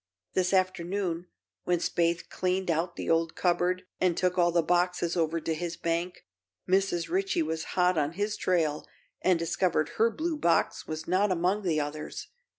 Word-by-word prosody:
This 185 -1 +1
afternoon, 185 -1 0 0.4
when 180 0 +2
Spaythe 170 0 0
cleaned 185 -1 -1
out 170 +2 -1
the - - -5
old 165 0 +1
cupboard 180 +1 +1 0.2
and 180 -2 +2
took 180 -1 +1
all 175 -1 +3
the 170 -1 +2
boxes 175 0 +1
over 165 -1 +1
to 160 - -2
his 170 +1 -4
bank, 170 +2 -2 0.4
Mrs. 185 -2 +1
Ritchie 375 -1 0
was 160 - -3
hot 180 -2 +4
on 150 +2 0
his 205 +3 -1
trail 160 -5 0 0.3
and 185 -2 +3
discovered 165 -1 0
her 225 +1 +4
blue 315 +6 -2
box 170 - +1
was 155 0 -5
not 190 +3 +2
among 185 +4 +1
the 165 -6 +1
others. 150 +1 -5
175 Hz, 165 wpm, -28 LUFS, 165-185 Hz, 0.4 s, hot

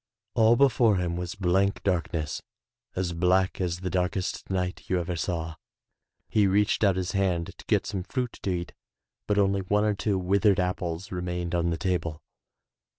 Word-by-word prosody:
All 115 0 +5
before 120 -5 +4
him 90 -2 -1
was 90 0 -4
blank 95 +1 +1
darkness, 85 -5 -1 0.5
as 90 -2 -1
black 90 +3 +2
as 90 -1 -2
the 95 - -2
darkest 90 +1 -1
night 90 -1 -2
you 90 - +1
ever 90 0 -3
saw. 85 -1 -3 0.7
He 105 -2 +3
reached 105 +3 +2
out 100 -3 +4
his 95 0 -2
hand 90 -4 0
to - - -14
get - - +2
some 95 - -3
fruit 125 +5 -4
to - - -2
eat, 85 -1 -3 0.5
but 105 - +1
only 100 -1 +3
one 105 +3 +1
or 105 - +2
40 100 - -7
THROUGH - - 0
FAIRY - - +3
HALLS 95 - -3
two - - -7
withered 100 0 +4
apples 90 0 -2
remained 90 -1 -3
on 85 -1 +1
the 85 - -1
table. 85 -4 -2
90 Hz, 190 wpm, -27 LUFS, 90-100 Hz, 0.7 s, All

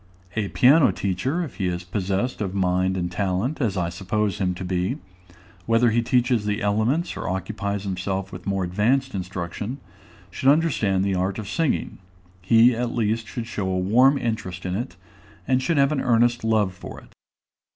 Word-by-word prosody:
A 105 -2 0
piano 135 +8 +5
teacher, 130 - -1
if 150 - -8
he 95 -4 -1
is 90 0 -3
possessed 100 +6 -2
of 95 -2 -3
mind 95 0 +1
and 90 -1 -2
talent, 100 - -1
as 105 -6 0
I 85 -2 0
suppose 100 +3 -2
him 90 -2 0
to 95 +1 -6
be, 90 +8 -1 0.7
whether 115 +1 +4
he 120 +2 +2
teaches 120 -1 +2
the 105 0 0
elements 110 - 0
or - - -4
occupies 100 +1 -3
himself 95 0 -3
with 90 0 -9
more 95 -1 0
advanced 115 +9 +1
instruction, 95 +5 -4 0.5
should 135 - +1
understand 125 - +2
the 100 - 0
art 95 +1 -1
of 110 -3 -6
singing; 160 - -1 0.4
he, 115 +6 +5
at 120 0 -2
least, 115 -1 0
should 120 -1 -5
show 100 -4 -3
a 95 - 0
warm 125 +9 +4
interest 100 -8 -4
in 90 - -2
it, 120 -2 -4 0.5
and 130 0 +2
should 165 +4 0
have 140 +1 +4
an 145 -3 0
earnest 120 -1 +2
love 110 -4 +2
for 90 - -9
it. - - -20
105 Hz, 180 wpm, -24 LUFS, 95-120 Hz, 0.7 s, piano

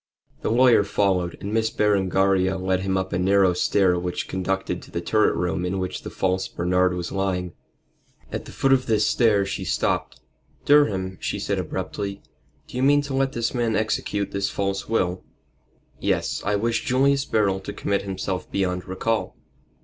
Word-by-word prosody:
The - - -1
lawyer 120 -1 +5
followed, 95 -3 0
and 100 +2 -5
Miss 110 0 +2
Berengaria 95 -2 +2
led 95 0 0
him 95 0 -1
up 95 -1 -3
a 90 - 0
narrow 95 0 +4
stair 90 0 +2
which 90 0 -3
conducted 95 +1 -2
to - - -14
the 85 - -3
turret 110 +5 +2
room 90 0 -1
in 90 +2 -2
which 95 -1 -3
the - - -7
false 95 0 -1
Bernard 90 +1 +1
was 85 -1 -4
lying. 95 -3 -2 0.8
At - - -4
the - - -10
foot 135 0 +2
of 130 -1 +1
this 110 -2 +2
stair 105 -4 +3
she 95 - -4
stopped. - - -1 0.5
"Durham," 95 - +3
she - - -2
said - - -2
abruptly, 100 -1 -4 0.4
"do - - -8
you - - 0
mean 145 +2 +4
to 140 -1 -5
let 135 0 +1
this 120 0 -1
man 120 -3 0
execute 105 -2 -1
this 100 0 -1
false 100 0 -2
will?" 90 -5 0 0.8
"Yes. - - -1
I 100 +1 +1
wish 115 +3 0
Julius 135 +2 +2
Beryl 100 -3 +1
to 95 - -7
commit 100 -1 -1
himself 95 -1 -4
beyond 90 -2 -1
recall." 110 +4 -2
100 Hz, 175 wpm, -24 LUFS, 95-110 Hz, 0.8 s, lawyer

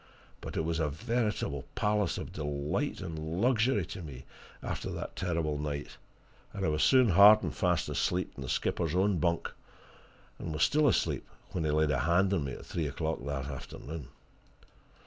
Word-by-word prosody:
But - - -6
it - - +2
was 85 0 -1
a 80 -2 +1
veritable 105 - -1
palace 105 -5 +1
of - - -6
delight 75 - -2
and 80 -1 -4
luxury 115 -4 +3
to 95 - -7
me 70 -5 -9 0.4
after - - -3
that - - -5
terrible 80 -5 -1
night, 75 -1 -4 0.6
and 100 -2 -2
I - - +2
was 75 0 0
soon 130 -3 +5
hard 100 +4 +8
and - - -2
fast 90 -4 +1
asleep 90 +1 0
in - - -9
the 65 - -5
skipper's 85 +4 0
own 95 -1 +2
bunk 85 +2 0 0.9
and 80 - -4
was 75 +2 +1
still 150 +6 +4
asleep 120 - +1 0.2
when 85 -3 -2
he - - +1
laid 75 0 +2
a 70 - +1
hand 90 +4 +3
on 80 -7 0
me 70 - -4
at - - -9
three 80 -3 -2
o'clock 80 +1 -3
that 70 -2 -3
afternoon. 70 +1 -7
85 Hz, 180 wpm, -31 LUFS, 75-100 Hz, 0.9 s, hard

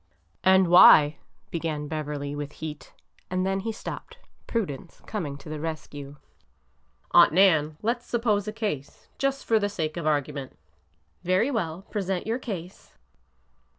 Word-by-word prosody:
'' 85 +1 -42
And 190 -1 +5
why—" 155 -4 +8 0.3
began 155 -3 -3
Beverly, 145 -2 -4
with 145 0 -5
heat, 155 -1 -8 0.4
and 185 0 0
then 195 0 0
he 225 +3 -3
stopped— 460 - -8 0.3
prudence 175 - -4
coming 155 -10 -4
to 140 - -14
the 155 0 -5
rescue. 145 -3 -6 0.5
" 60 +1 -40
Aunt 170 -3 +7
Nan, 160 -5 +4
let 235 +2 0
's - - -24
suppose 220 -4 0
a - - -2
case— 205 - -5
just 275 0 -1
for 225 -1 +3
the 205 -1 0
sake 160 -5 -3
of 165 -2 -2
argument." 145 -2 -2 0.7
Very 185 +9 +2
well. 180 - -2
Present 190 -3 -2
your 225 +3 -1
case." 185 -7 -8
170 Hz, 150 wpm, -26 LUFS, 150-205 Hz, 0.7 s, why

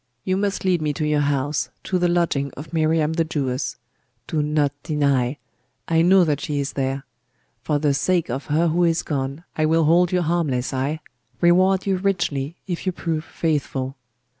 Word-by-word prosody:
You 185 - 0
must 200 0 -1
lead 180 -3 +2
me 150 -1 0
to 155 - -2
your 150 -1 +2
house, 140 0 0
to 185 - 0
the 175 - +3
lodging 170 -5 +1
of 150 +3 -9
Miriam 160 -1 +2
the 165 0 +2
Jewess. 140 -4 -2 0.5
Do 155 - -1
not 150 -1 +1
deny! 140 -3 +1 0.5
I 165 0 +3
know 185 +2 +6
that 150 -3 0
she 145 -2 -2
is 140 0 -2
there. 135 0 -2 0.6
For 150 +3 0
the 145 -1 +2
sake 175 +4 +1
of 130 +3 -4
her 165 +3 +2
who 175 +3 +2
is 165 -1 +2
gone 140 +1 -3
I 155 0 +2
will 165 +1 +3
hold 170 +3 +4
you 180 -1 +2
harmless, 150 -7 0
ay, 140 +4 -1 0.4
reward 185 +2 +4
you 195 -1 +1
richly, 170 -6 -1
if 180 0 -4
you - - +3
prove 165 -3 -3
faithful. 140 -5 -2
155 Hz, 185 wpm, -22 LUFS, 140-175 Hz, 0.6 s, know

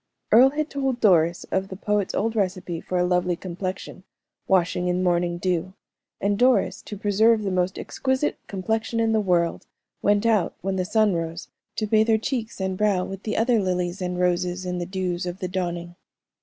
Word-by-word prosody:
Earle 250 +4 +8
had 305 +2 -2
told 270 -3 -1
Doris 170 -5 +3
of 190 0 0
the 190 - -7
poet's 210 0 -1
old 225 +2 0
recipe 185 -4 -2
for 185 - -3
a 180 - +3
lovely 180 0 +1
complexion, 185 +1 -6 0.4
washing 180 -1 +2
in 180 +1 0
morning 175 -1 +1
dew; 180 +1 -2 0.4
and 200 +1 0
Doris, 250 +1 +3
to 210 - -8
preserve 215 +2 +3
the 195 - -1
most 185 +1 0
exquisite 265 +2 -1
complexion 220 +4 -2
in 225 0 +2
the 220 -1 +2
world, 175 -4 0 0.3
went 205 +1 +2
out, 220 -5 +2
when 195 +1 -2
the 185 -1 -1
sun 215 0 +2
rose, 165 0 -4 0.3
to 215 - -1
bathe 220 +1 +3
her 220 -1 +4
cheeks 225 -1 -3
and 190 -1 -2
brow 200 -4 +2
with 195 0 -7
the 215 - -3
other 230 0 +3
lilies 180 -1 -2
and 180 0 -2
roses 180 0 0
in 180 0 -2
the 175 - -4
dews 180 -1 -2
of 175 +1 -4
the 190 -2 -4
dawning. 175 -2 -4
190 Hz, 190 wpm, -24 LUFS, 180-215 Hz, 0.4 s, Earle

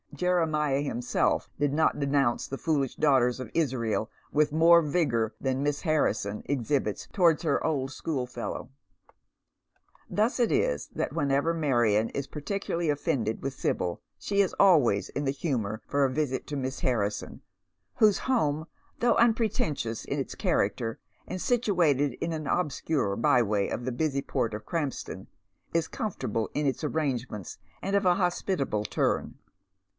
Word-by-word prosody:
Jeremiah 155 -6 +1
himself 125 -4 0
did 145 -1 +2
not 155 0 +2
denounce 140 -4 +1
the 135 - -5
foolish 140 -5 0
daughters 130 -4 +3
of 130 -4 -7
Israel 120 -8 0 0.2
with 150 0 +2
more 165 +2 +6
vigour 140 -8 0
than 135 0 -1
Miss 145 0 0
Harrison 150 - 0
exhibits 135 -5 -1
towards 170 -5 +3
her 150 -4 +1
old 135 -4 -1
schoolfellow. 130 -5 -4 1.4
Thus 220 +6 +1
it 235 - +3
is - - 0
that - - -2
whenever 145 +1 +1
Marion 120 -9 +2
is 140 -1 -4
particularly 170 +1 -3
offended 140 -7 -1
with 135 0 -3
Sibyl 85 -8 -2 0.2
she 200 0 +1
is 195 - 0
always 145 - +4
in 145 - -3
the 135 - +2
humour 120 -8 -2
for 140 0 +1
a 135 - +3
visit 135 -2 -1
to 145 - -4
Miss 130 0 -3
Harrison, 105 -5 -1 0.5
whose 215 -3 +4
home, 155 - 0 0.3
though 240 0 +3
unpretentious 215 - +1
in - - -2
its - - -4
character, 115 0 0 0.3
and 185 - -4
situated 175 - +2
in 165 +6 -3
an 155 -2 -4
obscure 150 - 0
by 125 +1 +4
way 105 -3 0
of 120 - -4
the 130 - -1
busy 140 +2 0
port 125 -5 -1
of 105 0 -8
Krampston, 150 -5 -4 0.5
is 165 -1 +1
com 220 -5 -3
fortable 110 - -3
in 150 - -1
its 135 +3 -1
arrangements, 130 - -3 0.2
and 195 +1 -1
of 200 -1 +2
a 180 -1 +5
hospitable 175 - 0
turn. - - -1
145 Hz, 150 wpm, -28 LUFS, 125-165 Hz, 1.4 s, more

